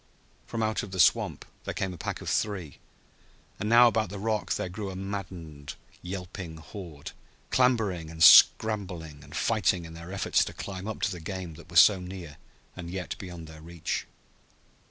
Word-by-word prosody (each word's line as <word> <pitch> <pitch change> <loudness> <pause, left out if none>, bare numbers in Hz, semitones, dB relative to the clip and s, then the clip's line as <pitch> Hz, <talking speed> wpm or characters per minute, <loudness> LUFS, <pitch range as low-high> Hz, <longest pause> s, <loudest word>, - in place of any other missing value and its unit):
From 115 -1 -2
out 110 0 0
of 105 - -7
the 95 0 -6
swamp - - +3 0.2
there - - -5
came 95 -1 -2
a - - -9
pack - - -4
of - - -8
three, 95 -9 -2 0.8
and 105 - -2
now 120 +1 +8
about 110 -4 +1
the 100 - -6
rock 110 +1 -1
there - - -2
grew 95 +3 -5
a 95 - -7
maddened, 90 -7 -6 0.3
yelping 90 -2 -6
horde, 80 -2 -9 0.4
clambering 110 -10 +2
and 80 0 -1
scrambling 90 -6 +6
and 75 +2 -12
fighting 100 -6 +1
in 80 - -10
their 85 +2 -9
efforts 100 -1 +2
to - - -7
climb 95 0 -6
up 110 - -5
to 105 - +2
the 90 - -6
game 90 0 -6
that 85 +2 -14
was 85 -2 +8
so 100 -3 +5
near 90 -4 -8 0.4
and 85 -2 -7
yet 90 0 -4
beyond 90 -3 -8
their 80 -1 -12
reach. 85 0 -4
90 Hz, 180 wpm, -28 LUFS, 80-100 Hz, 0.8 s, now